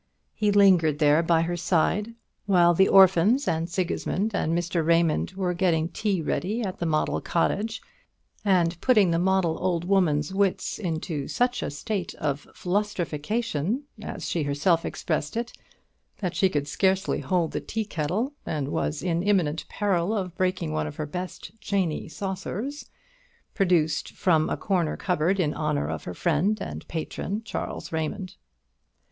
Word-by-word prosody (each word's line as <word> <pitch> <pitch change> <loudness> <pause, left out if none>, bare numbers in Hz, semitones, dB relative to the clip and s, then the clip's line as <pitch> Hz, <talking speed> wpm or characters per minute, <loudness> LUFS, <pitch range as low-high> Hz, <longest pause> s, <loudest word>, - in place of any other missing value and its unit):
He 210 -1 +1
lingered 185 -7 +5
there 150 +1 +4
by 165 -1 +3
her 175 +1 -2
side 185 +6 0 0.3
while 175 -3 +5
the 190 +3 +4
orphans 195 +7 +5
and 165 +1 0
Sigismund 185 +4 -1
and 160 - 0
Mr. 175 -1 -1
Raymond 165 +1 +2
were 185 -2 -1
getting 170 -3 +1
tea 195 -5 -1
ready 195 +11 -1
at 190 -3 -4
the 170 - -1
model 155 -1 0
cottage, 220 +6 -1 0.6
and 175 -4 +2
putting 210 -9 +4
the 165 - +2
model 185 -2 +1
old 175 -2 0
woman's 175 -4 +2
wits 195 -1 0
into 160 -6 -3
such 245 0 0
a - - -2
state 185 +5 -4
of 145 -1 -3
"flustrification," 200 - -1 0.2
as - - -6
she 170 - -1
herself 150 +4 +1
expressed 155 +3 -2
it, 235 +1 -3 0.6
that 185 -3 -3
she 190 +1 +3
could 145 -4 -1
scarcely 190 +5 +1
hold 175 -4 0
the - - -3
tea 220 -1 -3
kettle, 200 - -2
and 145 -3 -3
was 75 - -2
in 170 -2 0
imminent 180 -6 +1
peril 200 0 0
of 180 -3 -4
breaking 185 - -1
one 75 0 -1
of 75 - -7
her 155 - -3
best 180 +5 -6
"chaney" 190 -6 -1
saucers, 200 - -5 0.6
produced 175 -6 +1
from 160 -4 +2
a - - -1
corner 175 -5 0
cupboard 180 +1 0
in 150 -5 +1
honour 75 - -1
of 80 -1 -5
her 90 - -5
friend 180 - +1
and - - -6
patron, 190 +6 -4
Charles - - -5
Raymond. 175 +4 -3
180 Hz, 155 wpm, -26 LUFS, 160-195 Hz, 0.6 s, lingered